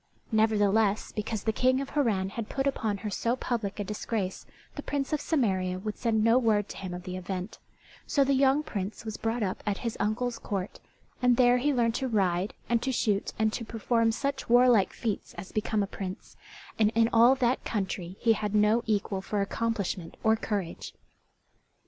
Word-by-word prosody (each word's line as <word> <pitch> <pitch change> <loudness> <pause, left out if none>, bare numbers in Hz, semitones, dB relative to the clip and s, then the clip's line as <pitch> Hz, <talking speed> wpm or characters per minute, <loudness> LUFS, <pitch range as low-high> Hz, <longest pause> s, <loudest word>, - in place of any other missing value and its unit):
Nevertheless, 215 -1 +2
because 210 -1 -3
the 220 - 0
King 255 +3 +2
of 275 0 -5
Harran 215 -10 +1
had 220 +1 -6
put 270 0 -1
upon 220 -7 0
her 210 - -2
so 230 +5 0
public 225 -6 -3
a - - 0
disgrace, 205 -1 -3 0.3
the - - -4
Prince 280 0 -2
of 300 - 0
Samaria 190 - 0
would 210 +3 -4
send 220 -3 +1
no 230 +3 +5
word 215 -4 +2
to - - -7
him 190 -2 -6
of 180 - -8
the 180 0 -5
event; 185 +2 -5 0.5
so 280 - +3
the 275 +1 +2
young 270 +2 +3
Prince 205 -3 -5
was 220 -1 -4
brought 225 0 -1
up 190 -2 -2
at 205 -2 -1
his 230 - -1
uncle's 230 +3 -1
court, 195 -1 -4 0.4
and 250 -1 +4
there 250 -1 +5
he 290 +4 +2
learned 235 -4 +2
to 265 +3 -1
ride 190 -4 0
and 235 -1 +1
to 265 - -1
shoot 210 -5 0
and 220 0 +1
to 235 - -3
perform 230 +1 +1
such 275 +3 -3
warlike 240 -5 +5
feats 220 -4 -4
as 190 - -8
become 215 -1 0
a - - 0
prince, 190 -1 -7 0.4
and 215 -1 +4
in 225 0 +5
all 235 +3 +7
that 255 -1 +1
country 190 -3 -3
he 230 -1 +4
had 210 -1 -2
no 210 +2 +4
equal 200 -2 0
for 205 +2 -2
accomplishment 200 -4 -2
or 220 0 +4
courage. 205 -6 -4
220 Hz, 190 wpm, -28 LUFS, 200-240 Hz, 0.5 s, all